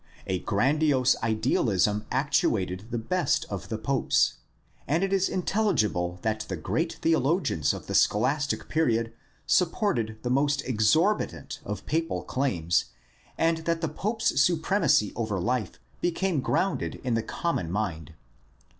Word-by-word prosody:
A 95 -1 -1
grandiose 130 - +2
idealism 110 -2 +1
actuated 105 -8 0
the 120 - -2
best 160 +7 0
of 100 -3 -5
the 110 - -2
popes, 125 +4 +1 0.5
and 160 +7 +1
it 195 0 0
is 195 -1 +2
intelligible 110 - 0
that 110 -1 0
the 95 - -2
great 165 - -1
theologians 160 - +2
of - - -6
the - - -5
scholastic 140 +7 +1
period 115 -7 +1 0.3
supported 170 - +1
the 125 - -1
most 140 +1 +2
exorbitant 130 - +1
of - - -6
papal 165 +1 -1
claims 85 - 0 0.5
and 165 0 +2
that 165 -1 0
the 165 - 0
pope's 210 0 0
supremacy 160 - +2
over 110 -4 -2
life 115 -1 -1 0.3
became 175 -3 0
grounded 195 +8 -1
in 125 -2 -1
the 115 - +1
common 110 - -2
mind. 85 -6 -3
130 Hz, 130 wpm, -27 LUFS, 105-165 Hz, 0.5 s, grandiose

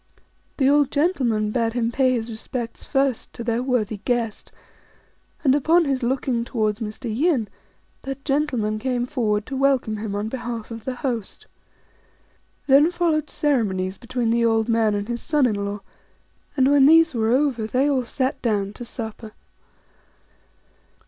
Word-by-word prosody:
The 265 - +3
old 285 0 +4
gentleman 255 - +1
bade 230 -1 0
him 235 -1 0
pay 260 +1 +2
his 230 -2 -2
respects 230 +1 -6
first 270 -3 0
to 235 - -7
their 230 0 0
worthy 245 -5 -1
guest; 230 0 -2 0.9
and 265 -3 +4
upon 320 +4 +3
his 270 -2 -1
looking 245 -1 0
towards 215 -3 -1
Mr. 220 +1 -5
Yin, 275 -5 +1 0.5
that 270 0 -7
gentleman 260 -7 0
came 245 0 -1
forward 220 -6 -1
to 275 - -6
welcome 265 -5 +1
him 210 -1 -4
on 205 +1 -2
behalf 235 -2 -5
of 225 -1 -8
the 260 - -3
host. 240 -6 -4 1.2
Then 285 +4 +6
followed 330 -4 0
ceremonies 195 -10 0
between 240 -1 -1
the 235 0 +2
old 225 -1 +2
man 225 -2 +2
and 205 0 -3
his 240 0 -3
son 300 -4 +2
in 235 - +2
law; 200 0 -4 0.8
and 265 +1 +4
when 280 -1 +6
these 325 0 +6
were 225 -2 0
over, 250 -3 +1
they 255 +5 +1
all 270 -3 +1
sat 260 +3 -2
down 205 -4 -1
to 245 - -9
supper. 220 -2 -7
240 Hz, 155 wpm, -23 LUFS, 220-275 Hz, 1.2 s, Then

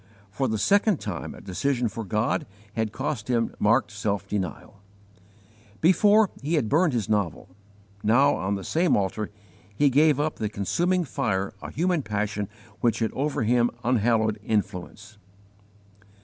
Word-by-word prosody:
For 130 +6 -1
the 110 -2 -1
second 200 - +3
time 100 -5 -5
a - - -12
decision 120 +6 -1
for 115 +1 -5
God 110 - -1 0.3
had 110 -2 -1
cost 110 0 -3
him 115 -2 0
marked 105 +1 +3
self 100 -1 -2
denial. 100 0 -5 1.0
Before, 205 +5 +5
he 150 +5 0
had 130 -9 0
burned 160 0 +3
his 115 -5 -1
novel; 100 -4 -1 0.5
now, 130 +7 +4
on 95 +2 -1
the 95 - -5
same 170 - +2
altar, 100 +2 -2 0.5
he 140 +5 +3
gave 145 +1 +4
up 155 +1 -1
to - - -13
the 105 - 0
consuming 175 - 0
fire 95 -7 -1
a - - -6
human 175 0 0
passion 105 -3 -2 0.3
which 115 -2 +2
had 110 -2 0
over 140 -3 -1
him 120 +1 +3
an - - -17 0.2
unhallowed 110 -1 +1
influence. 105 0 -3
115 Hz, 155 wpm, -25 LUFS, 105-145 Hz, 1.0 s, Before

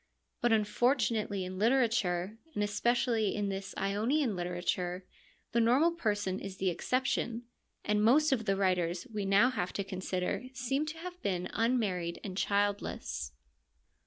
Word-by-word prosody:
But 240 - +3
unfortunately 215 -2 +1
in 185 +1 -6
literature, 220 -5 +1 0.2
and 205 - +1
especially 225 +1 +1
in 205 -2 -1
this 195 0 -5
Ionian 220 +5 +1
literature, 180 +1 -2 0.5
the 235 - +2
normal 260 +9 +4
person 205 - -1
is 190 -1 -7
the 185 -1 +1
exception, 240 +3 -1 0.4
and 210 0 +2
most 295 +7 +5
of 230 -5 +1
the 195 -2 +2
writers 180 -3 0
we 205 -2 -2
now 200 +6 +5
have 180 -7 -2
to 200 - -2
consider 185 +3 -3
seem 270 +4 -1
to 310 +1 -5
have 360 +2 -8
been 180 -2 -2
unmarried 205 -8 0
and 190 -2 -5
childless. 200 - -1
205 Hz, 140 wpm, -31 LUFS, 190-240 Hz, 0.5 s, most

